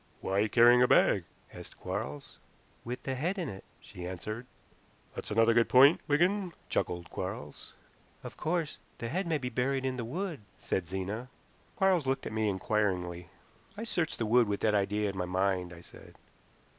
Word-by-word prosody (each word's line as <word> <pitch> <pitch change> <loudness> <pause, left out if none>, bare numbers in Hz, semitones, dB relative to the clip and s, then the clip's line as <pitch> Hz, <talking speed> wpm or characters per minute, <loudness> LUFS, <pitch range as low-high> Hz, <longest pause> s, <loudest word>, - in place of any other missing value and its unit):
"Why 100 +3 +1
carrying 120 +2 +6
a 125 - +6
bag?" - - +4 0.3
asked - - -11
Quarles. 70 +1 -5 0.4
"With 120 +1 -5
the 135 - -2
head 165 +10 -1
in 175 -4 -2
it," 95 -3 -8 0.2
she 90 -1 -9
answered. 110 +7 -6 0.7
"That's - - -6
another 115 +2 +4
good 115 0 +3
point, 135 +5 +7
Wigan," 175 +5 +2 0.2
chuckled 85 -2 -2
Quarles. 75 0 -6 0.5
"Of - - -8
course, 160 -1 -2 0.2
the 115 - -4
head 185 +5 -1
may 160 -2 +1
be 125 -3 -4
buried 130 +2 0
in 130 -1 -1
the 120 - -3
wood," 165 - -4 0.2
said 90 -3 -2
Zena. 100 +7 -4 0.5
Quarles 185 -7 +2
looked 135 0 0
at - - -5
me 110 -1 +1
inquiringly. 95 -3 -1 0.5
"I 220 - -4
searched 175 -8 -1
the 115 - -1
wood 120 +1 +4
with 100 -1 -2
that 110 - +2
idea 105 +1 +1
in 100 - -3
my 90 - 0
mind," 90 -1 0
I 85 -1 -11
said. - - -15
115 Hz, 175 wpm, -31 LUFS, 95-140 Hz, 0.7 s, point